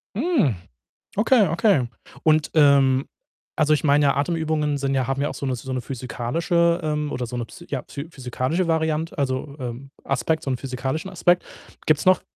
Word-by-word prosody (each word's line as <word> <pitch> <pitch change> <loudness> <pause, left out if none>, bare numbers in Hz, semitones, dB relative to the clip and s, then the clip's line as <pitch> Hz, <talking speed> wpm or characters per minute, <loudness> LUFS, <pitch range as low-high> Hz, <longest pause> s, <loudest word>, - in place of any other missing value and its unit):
Mhm. 235 - +2 0.6
Okay, 215 -3 +4
okay 165 - +2 0.3
und, 155 -1 +3
ähm 140 -3 +5 0.5
also, 155 -1 +3
ich 150 - -2
meine 145 0 +4
ja, 140 - +2
Atemübungen 155 -1 0
sind 135 0 -1
ja 130 -2 +1
haben 135 +1 -1
ja 145 - +1
auch - - -6
so - - -6
'ne 130 -2 0
so 125 +2 -7
'ne 130 -1 -2
physikalische, 165 +8 0
ähm 150 -1 -1
oder 125 - -3
so 125 - -6
'ne, 120 - -2
psy - - -13
ja, - - -3
phy 140 +3 -7
physikalische 135 +5 -2
Variante 160 0 0
also, 140 +1 -2
ähm, 125 +1 -6
Aspekt 160 +4 0
so 135 - -2
'n 130 - 0
physikalischen 130 +7 -4
Aspekt. 180 -1 +2 0.4
Gibt's 155 +1 +2
noch 185 0 +5
145 Hz, 185 wpm, -23 LUFS, 130-165 Hz, 0.6 s, ähm